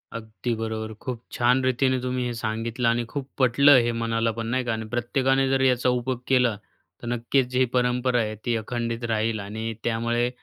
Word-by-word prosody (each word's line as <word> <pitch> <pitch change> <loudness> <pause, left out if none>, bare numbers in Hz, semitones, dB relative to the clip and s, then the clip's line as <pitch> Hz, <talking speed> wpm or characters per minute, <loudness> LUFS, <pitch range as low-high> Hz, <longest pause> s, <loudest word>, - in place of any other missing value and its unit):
अगदी 115 +1 -4
बरोबर. 110 0 -4
खूप 120 +2 -6
छान 125 +2 +2
रीतीने 130 0 +2
तुम्ही 125 0 -2
हे 120 - -2
सांगितलं 115 +1 -2
आणि 120 0 0
खूप 140 -2 -5
पटलं 140 +2 +6
हे 120 - +1
मनाला 115 0 0
पण, 115 +1 -5
नाही 130 +2 0
का. 120 - 0
आणि 110 0 -4
प्रत्येकाने 135 +3 +1
जर 135 0 +2
याचा 125 -1 +3
उपयोग 125 0 -1
केला, 125 -4 +3 0.5
तर 120 - -7
नक्कीच 120 +2 +1
जी 130 0 +3
परंपरा 125 0 +1
आहे, 110 -1 -3
ती 120 - +1
अखंडित 115 +1 -3
राहील. 110 0 0
आणि 110 +3 -4
त्यामुळे 120 +1 0
120 Hz, 185 wpm, -25 LUFS, 115-125 Hz, 0.5 s, पटलं